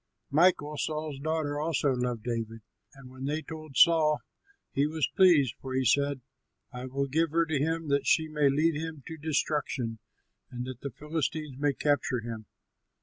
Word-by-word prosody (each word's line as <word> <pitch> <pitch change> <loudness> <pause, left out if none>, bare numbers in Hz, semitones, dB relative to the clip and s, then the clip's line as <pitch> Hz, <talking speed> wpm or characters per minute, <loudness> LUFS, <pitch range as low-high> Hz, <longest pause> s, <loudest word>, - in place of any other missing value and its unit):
Michal, 150 -1 +3
Saul's 155 -2 -3
daughter, 155 -1 -1
also 150 -2 +1
loved 125 -3 -2
David, 115 -1 -3 0.3
and 135 -2 -13
when 130 +1 -7
they 150 +3 -2
told 155 -4 -8
Saul, 155 -3 +6 0.6
he 140 +2 +2
was 155 -1 0
pleased, 165 -10 +5
for 130 -1 -5
he 130 0 +1
said, 140 0 +2 0.5
"I 125 +1 -6
will 140 +2 -1
give 160 +4 +1
her 165 +2 +2
to 155 -3 -1
him, 160 +2 -1
that 140 -2 +1
she 160 - +3
may 150 -2 +2
lead 155 +4 +2
him 155 -2 -5
to 160 - -7
destruction 145 -6 -1 0.5
and 125 0 -5
that 130 -2 -7
the 140 - -4
Philistines 150 +1 -3
may 145 0 +2
capture 135 -4 0
him." 110 -2 -7
145 Hz, 170 wpm, -29 LUFS, 130-155 Hz, 0.6 s, Saul